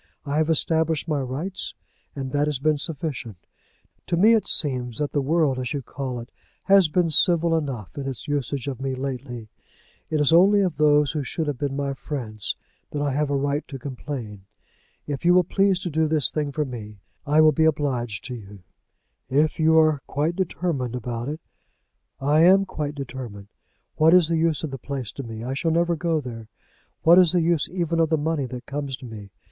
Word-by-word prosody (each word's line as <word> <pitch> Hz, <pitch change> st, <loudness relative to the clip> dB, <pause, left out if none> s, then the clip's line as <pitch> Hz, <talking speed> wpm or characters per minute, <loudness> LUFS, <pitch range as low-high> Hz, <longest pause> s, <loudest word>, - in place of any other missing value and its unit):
I 145 Hz, +1 st, -1 dB
have 155 Hz, +1 st, +2 dB
established 160 Hz, 0 st, +1 dB
my 150 Hz, -3 st, 0 dB
rights, 145 Hz, +9 st, -4 dB, 0.4 s
and 135 Hz, -2 st, -4 dB
that 145 Hz, +1 st, +1 dB
has 150 Hz, -2 st, 0 dB
been 150 Hz, +2 st, +1 dB
sufficient. 140 Hz, -, -4 dB, 0.7 s
To 170 Hz, -, 0 dB
me 215 Hz, +6 st, +6 dB
it 225 Hz, -, +2 dB
seems 125 Hz, -6 st, 0 dB
that 150 Hz, -1 st, -1 dB
the 145 Hz, -, 0 dB
world, 145 Hz, -2 st, +1 dB
as 125 Hz, +2 st, -3 dB
you 140 Hz, -2 st, -3 dB
call 130 Hz, -3 st, -5 dB
it, 115 Hz, -, -10 dB, 0.3 s
has 195 Hz, -3 st, +5 dB
been 165 Hz, +1 st, +1 dB
civil 170 Hz, 0 st, +4 dB
enough 135 Hz, -, -4 dB
in 140 Hz, -1 st, -4 dB
its 135 Hz, +1 st, -6 dB
usage 140 Hz, -2 st, -2 dB
of 135 Hz, -2 st, -4 dB
me 135 Hz, -1 st, -2 dB
lately. 130 Hz, -3 st, -5 dB, 0.6 s
It 155 Hz, -, 0 dB
is 150 Hz, +2 st, +4 dB
only 200 Hz, +4 st, +6 dB
of 185 Hz, -5 st, -1 dB
those 150 Hz, -2 st, +4 dB
who 150 Hz, -, -2 dB
should 160 Hz, +4 st, -3 dB
have 145 Hz, -4 st, -3 dB
been 140 Hz, -2 st, -2 dB
my 140 Hz, -1 st, -2 dB
friends 120 Hz, -6 st, -4 dB, 0.3 s
that 145 Hz, -, -4 dB
I 145 Hz, -1 st, 0 dB
have 145 Hz, +2 st, 0 dB
a 140 Hz, -, 0 dB
right 140 Hz, +2 st, 0 dB
to 135 Hz, -, -7 dB
complain. 125 Hz, -6 st, -7 dB, 0.6 s
If 145 Hz, 0 st, -4 dB
you 175 Hz, +1 st, +5 dB
will 180 Hz, -, +6 dB
please 195 Hz, +2 st, +2 dB
to 175 Hz, -, -4 dB
do 160 Hz, +1 st, +2 dB
this 155 Hz, -4 st, +1 dB
thing 150 Hz, -2 st, -2 dB
for 150 Hz, +1 st, -1 dB
me, 110 Hz, -5 st, -8 dB, 0.3 s
I 150 Hz, +2 st, +4 dB
will 155 Hz, 0 st, +7 dB
be 160 Hz, +2 st, +2 dB
obliged 130 Hz, -8 st, -1 dB
to 125 Hz, -, -5 dB
you." 100 Hz, -5 st, -10 dB, 0.7 s
"If 150 Hz, +4 st, +2 dB
you 160 Hz, 0 st, +4 dB
are 155 Hz, -3 st, +4 dB
quite 155 Hz, +5 st, -1 dB
determined 165 Hz, -9 st, -2 dB
about 120 Hz, +1 st, -4 dB
it 155 Hz, +2 st, -5 dB, 0.5 s
" -, -, -51 dB
"I 145 Hz, +3 st, +2 dB
am 190 Hz, +4 st, +6 dB
quite 150 Hz, -5 st, -4 dB
determined. 120 Hz, -7 st, -7 dB, 0.5 s
What 160 Hz, +3 st, +6 dB
is 175 Hz, -3 st, +5 dB
the 165 Hz, -, +1 dB
use 160 Hz, -1 st, +1 dB
of 155 Hz, -, -3 dB
the 135 Hz, -, -6 dB
place 130 Hz, -6 st, -4 dB
to -, -, -7 dB
me? 115 Hz, -3 st, -7 dB
I 125 Hz, -, -5 dB, 0.2 s
never 170 Hz, +1 st, +2 dB
shall -, -, -1 dB
go 165 Hz, -1 st, 0 dB
there. 115 Hz, -5 st, -8 dB, 0.6 s
What 170 Hz, +3 st, +7 dB
is 180 Hz, -2 st, +5 dB
the 175 Hz, -, +3 dB
use 165 Hz, -2 st, +1 dB
even 170 Hz, -2 st, -1 dB
of 165 Hz, -1 st, +3 dB
the 160 Hz, -, +2 dB
money 150 Hz, -2 st, -1 dB
that 125 Hz, -1 st, -8 dB
comes 140 Hz, -2 st, -4 dB
to 130 Hz, -, -11 dB
me? 105 Hz, -4 st, -9 dB
145 Hz, 210 wpm, -24 LUFS, 130-160 Hz, 0.7 s, will